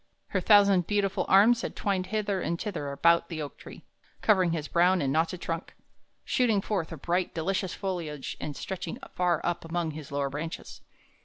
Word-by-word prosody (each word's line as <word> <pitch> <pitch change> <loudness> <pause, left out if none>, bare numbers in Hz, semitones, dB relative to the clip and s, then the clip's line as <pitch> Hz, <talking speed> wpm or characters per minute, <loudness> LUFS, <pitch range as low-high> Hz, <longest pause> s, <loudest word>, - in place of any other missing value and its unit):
Her 190 - 0
thousand 200 -3 +5
beautiful 200 -2 0
arms 225 +5 +6
had - - -5
twined 190 -2 -1
hither 205 -2 -1
and 170 0 -2
thither 165 -10 -4
about 170 +4 +3
the 165 -3 -5
oak 145 -2 -6
tree, - - -11 0.4
covering 190 -5 +4
his 155 -2 -2
brown 180 +2 +3
and 135 -4 0
knotted 165 +3 0
trunk, 165 +1 -4 0.5
shooting 230 -5 +2
forth 195 -4 -2
a 165 - -6
bright, 175 +5 -1
delicious 185 +2 -1
foliage 170 -8 -4
and 150 -1 -4
stretching 180 0 -5 0.2
far 175 -3 +1
up 175 0 -1
among 165 0 -2
his 150 -2 -9
lower 140 -1 -1
branches. 160 +3 -6
175 Hz, 175 wpm, -28 LUFS, 160-195 Hz, 0.5 s, arms